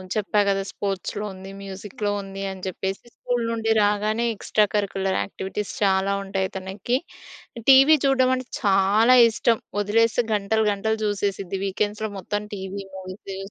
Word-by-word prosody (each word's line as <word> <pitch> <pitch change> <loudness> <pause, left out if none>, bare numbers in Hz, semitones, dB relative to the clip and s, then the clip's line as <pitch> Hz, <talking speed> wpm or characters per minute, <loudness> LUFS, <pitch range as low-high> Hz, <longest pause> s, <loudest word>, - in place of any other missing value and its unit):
చెప్పా 210 0 +1
కదా! 195 0 +1
స్పోర్ట్స్‌లో 200 +1 -3
ఉంది, 190 +1 -10
మ్యూజిక్‌లో 200 +1 -4
ఉంది 195 0 -7
అని 190 -1 -10
చెప్పేసి. 190 +1 -4
స్కూల్ 245 -1 -2
నుండి 225 -1 0
రాగానే 210 +3 +1
ఎక్స్‌ట్రా 210 +1 +2
కరిక్యులర్ 195 -2 0
యాక్టివిటీస్ 195 +1 -5
చాలా 195 0 +2
ఉంటాయి 195 -1 -2
తనకి. 190 +6 -2 0.7
టీవీ 275 +4 +8
చూడడం 260 -1 +3
అంటే 255 -1 -6 0.2
చాలా 205 +5 +4
ఇష్టం 225 +1 +1 0.2
వదిలేస్తే 230 +3 +2
గంటలు 215 +2 +1
గంటలు 220 +2 -1
చూసేసిద్ది. 195 -2 -2
వీకెండ్స్‌లో 210 +2 -2
మొత్తం 205 +3 -3
టీవీ, 195 +1 -6
మూవీసు 190 +1 -8
205 Hz, 135 wpm, -24 LUFS, 195-220 Hz, 0.7 s, టీవీ